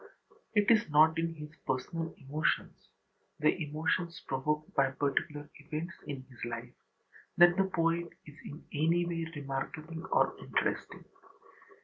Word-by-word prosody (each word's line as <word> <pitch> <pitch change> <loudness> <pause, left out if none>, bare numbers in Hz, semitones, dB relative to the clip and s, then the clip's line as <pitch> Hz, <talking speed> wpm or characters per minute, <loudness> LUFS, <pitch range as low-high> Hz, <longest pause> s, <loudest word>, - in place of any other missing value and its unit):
It 205 +1 +5
is 215 -7 +4
not 155 +2 +6
in 165 0 -1
his 150 0 -9
personal 165 +5 -2
emotions, 145 +3 -1 0.5
the 155 0 +4
emotions 165 +3 -1
provoked 150 +3 -1
by 135 -1 +4
particular 145 +2 -1
events 155 +4 -4
in 135 -2 -5
his 125 -3 -11
life, 120 +1 -5 0.6
that 175 0 +8
the 195 0 +3
poet 170 -2 +1 0.2
is 150 - -12
in 150 - -9
any 165 +4 +3
way 165 -1 -2
remarkable 150 +5 -4
or - - +3
interesting. - - -2
155 Hz, 130 wpm, -32 LUFS, 145-170 Hz, 0.6 s, that